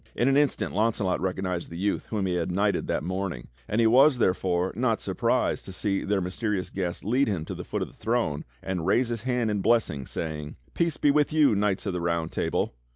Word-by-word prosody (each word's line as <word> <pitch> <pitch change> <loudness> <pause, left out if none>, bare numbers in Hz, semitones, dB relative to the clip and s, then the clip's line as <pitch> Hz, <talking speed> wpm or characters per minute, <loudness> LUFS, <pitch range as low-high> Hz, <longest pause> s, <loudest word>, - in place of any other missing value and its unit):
In 120 - +2
an 135 - +4
instant 145 -1 +1
Launcelot 105 -3 +1
recognized 90 -1 -2
the 85 - -7
youth 100 +3 -1
whom 105 -3 -1
he 90 - 0
had 90 0 -1
knighted 100 +3 +1
that - - -1
morning; 95 -6 -4 0.2
and 105 - 0
he 115 - +4
was, 130 +4 +6
therefore, 90 -3 +1
not 115 -1 +1
surprised - - 0
to - - -7
see 95 +1 -1
their 100 -1 0
mysterious 95 0 -2
guest 90 -2 -3
lead 125 +6 +2
him 90 -7 -2
to - - -5
the - - -6
foot - - -3
of - - -5
the - - -16
throne 110 -11 -1 0.2
and 90 -3 -3
raise 120 +5 +3
his 115 -2 -3
hand 125 -2 0
in 105 -1 -1
blessing, 100 - +1
saying: 75 -2 -5 0.2
"Peace 170 -2 0
be 145 - +4
with 150 +1 +2
you, 150 -5 +4
knights 100 -1 0
of 100 - -1
the 90 - -2
Round 85 -1 -1
Table!" - - -1
100 Hz, 220 wpm, -27 LUFS, 90-115 Hz, 0.2 s, was